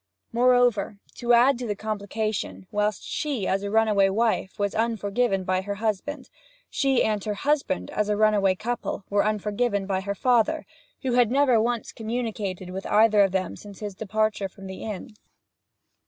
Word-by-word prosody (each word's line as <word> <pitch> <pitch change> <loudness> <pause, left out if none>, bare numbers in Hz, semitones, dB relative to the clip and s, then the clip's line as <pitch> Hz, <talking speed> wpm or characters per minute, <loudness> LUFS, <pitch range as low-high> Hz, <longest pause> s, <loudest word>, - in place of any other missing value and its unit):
Moreover, 245 -4 +3 0.2
to 240 0 +2
add 245 +2 +5
to 245 - -4
the 205 - -1
complication, 215 -1 -3
whilst 210 -1 0
she, 275 -10 -2
as 195 +1 +1
a 200 - -3
runaway 210 -2 +3
wife, 220 -2 0
was 205 -1 -1
unforgiven 220 -2 0
by 185 0 0
her 200 +1 -4
husband, 220 +7 -3 0.4
she 270 -2 +2
and 210 -2 0
her 210 -1 -2
husband, 275 - -1
as 210 0 -1
a 210 - +1
runaway 205 -3 +3
couple, 235 0 -3
were 200 0 +3
unforgiven 210 0 0
by 190 -1 -1
her 200 +1 -3
father, 250 +7 +2 0.4
who 255 -2 0
had 245 -2 +4
never 260 -3 +4
once 235 0 -1
communicated 220 -5 -4
with 190 +1 -5
either 215 0 +5
of 195 -2 +3
them 185 -1 -2
since 205 -2 -12
his 210 -2 -5
departure 215 0 -1
from 195 0 -13
the 190 0 -8
inn. 210 0 -6
215 Hz, 170 wpm, -25 LUFS, 200-235 Hz, 0.4 s, add